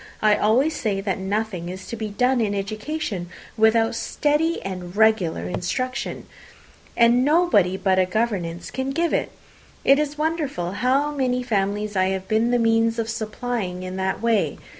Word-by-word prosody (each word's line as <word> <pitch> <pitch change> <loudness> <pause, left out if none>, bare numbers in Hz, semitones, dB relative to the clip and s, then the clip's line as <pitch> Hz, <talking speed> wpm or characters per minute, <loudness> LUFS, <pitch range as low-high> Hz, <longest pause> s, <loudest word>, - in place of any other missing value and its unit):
I 215 -1 +4
always 255 +11 +2
say 205 -4 -1
that 195 -1 -2
nothing 190 -3 -2
is 185 +1 -7
to - - -6
be 220 -1 -4
done 250 +4 +1
in 205 -2 0
education 210 - -4 0.3
without 225 +1 +3
steady 300 +7 0
and 180 -1 -6
regular 205 - +2
instruction, 255 - -3 0.7
and 235 +1 +5
nobody 285 - +3
but 190 -1 +2
a 185 - +3
governess 180 -5 -2
can 265 +1 -3
give 335 +2 0
it. - - 0 0.5
It 275 +1 +6
is 300 0 -2
wonderful 300 - -2
how 265 +8 +1
many 255 -3 0
families 205 -2 -1
I 185 0 +3
have 190 0 -2
been 220 +2 +2
the 245 - +3
means 225 0 +2
of 225 -1 -2
supplying 220 -4 -4
in 185 0 -5
that 190 +3 -2
way. 230 -3 +1
220 Hz, 160 wpm, -23 LUFS, 190-250 Hz, 0.7 s, It